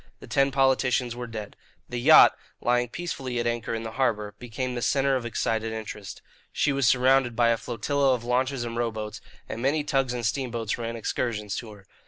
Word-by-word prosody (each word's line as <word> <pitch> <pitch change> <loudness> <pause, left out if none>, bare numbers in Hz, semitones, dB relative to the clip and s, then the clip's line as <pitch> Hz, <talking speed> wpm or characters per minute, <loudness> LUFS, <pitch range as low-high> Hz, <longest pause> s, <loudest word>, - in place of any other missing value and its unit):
The - - -11
ten 135 0 +2
politicians 130 -2 +2
were 120 0 -5
dead. 110 -3 -7 0.3
The 120 - -4
yacht, 155 +5 +8 0.2
lying 120 0 +1
peacefully 135 -6 -4
at 120 - -1
anchor 120 -1 -1
in 115 - -4
the 110 - -5
harbour, 110 -5 0
became 125 +1 -4
the 120 - -3
centre 135 +1 +2
of 120 -2 -2
excited 115 0 -1
interest. 105 -2 -7 0.3
She 145 - +1
was 135 -3 +2
surrounded 130 -1 +4
by 120 0 +4
a 115 - +4
flotilla 130 +5 0
of 120 - -7
launches 125 +1 0
and 115 -1 -5
rowboats, 110 -3 -3 0.3
and 115 - -5
many 145 +4 +1
tugs 135 -3 0
and 120 -2 -3
steamboats 120 -3 -2
ran 115 0 -3
excursions 105 -2 -2
to 115 - -6
her. 100 -1 -16
120 Hz, 195 wpm, -26 LUFS, 115-130 Hz, 0.3 s, yacht